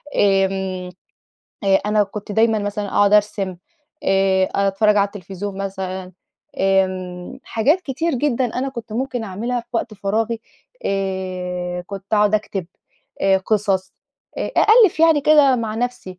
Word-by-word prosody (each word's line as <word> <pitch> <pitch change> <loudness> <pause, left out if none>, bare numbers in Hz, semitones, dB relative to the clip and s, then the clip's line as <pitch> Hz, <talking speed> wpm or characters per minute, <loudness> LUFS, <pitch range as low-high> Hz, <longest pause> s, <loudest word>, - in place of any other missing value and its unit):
آمم، 190 -2 +1 0.8
آآ 195 -1 +4
أنا 210 0 +3
كنت 205 +1 -6
دايمًا 220 +1 +3
مثلًا 205 0 -3
أقعُد 205 +1 +3
أرسم، 205 -3 +2 0.5
آآ، 195 -1 +3
أتفرّج 200 +2 +2
على 200 -1 +4
التلفزيون 200 0 -7
مثلًا، 190 -1 -5 0.5
آمم 185 -2 0
حاجات 280 +11 +2
كتير 310 +1 -2
جدًا 260 -1 0
أنا 265 +2 -1
كنت 235 -4 -8
ممكن 245 0 -2
أعملها 230 +5 -3
في 235 - -20
وقت 230 -2 -2
فراغي، 220 +3 -1 0.4
آآ 185 -2 -3
كنت 195 -1 -7
أقعُد 210 0 +3
أكتب 205 -4 -2 0.5
آآ 195 0 +4
قصص 195 -1 0 0.5
آآ، - - -3
أألّف 430 -6 +5
يعني 325 -2 +5
كده 285 -3 +5
مع 225 -2 -3
نفْسي، 235 -6 -4
205 Hz, 135 wpm, -20 LUFS, 190-230 Hz, 0.8 s, أألّف